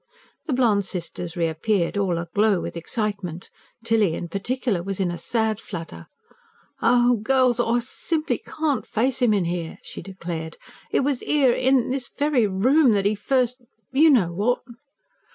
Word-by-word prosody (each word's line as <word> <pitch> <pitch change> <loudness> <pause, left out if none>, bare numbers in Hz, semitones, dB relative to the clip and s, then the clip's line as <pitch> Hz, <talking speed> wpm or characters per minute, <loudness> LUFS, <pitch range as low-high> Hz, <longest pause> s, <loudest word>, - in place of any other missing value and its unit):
The 295 - 0
blonde 230 -6 +3
sisters 175 -1 -5
reappeared, 170 +4 0
all 190 -4 0
aglow 195 +4 +1
with - - -6
excitement. 185 -1 -3 0.3
Tilly, 220 -7 +2
in 170 - -5
particular, 210 +1 -1
was 195 +2 -4
in 185 -2 0
a 175 - -5
sad 220 -2 0
flutter. 170 -7 -8 1.1
"Girls, 255 0 +2
I 240 0 +2
simply 305 +6 -2
CAN'T 305 -3 -2
face 255 +4 0
'im 240 -3 +4
in 200 -4 +2
'ere!" 170 -1 -4
she - - -8
declared. 170 -4 -6 0.3
"It - - +1
was 275 -2 0
'ere, 275 -5 +3
in 260 -1 +2
this 260 -1 -2
very 285 -6 +1
room, 250 +7 +4
that 200 -1 +1
'e 205 - +3
first 250 +3 0 0.3
you 300 +5 +5
know 200 - +3
what!" 215 +8 0
215 Hz, 155 wpm, -23 LUFS, 180-255 Hz, 1.1 s, you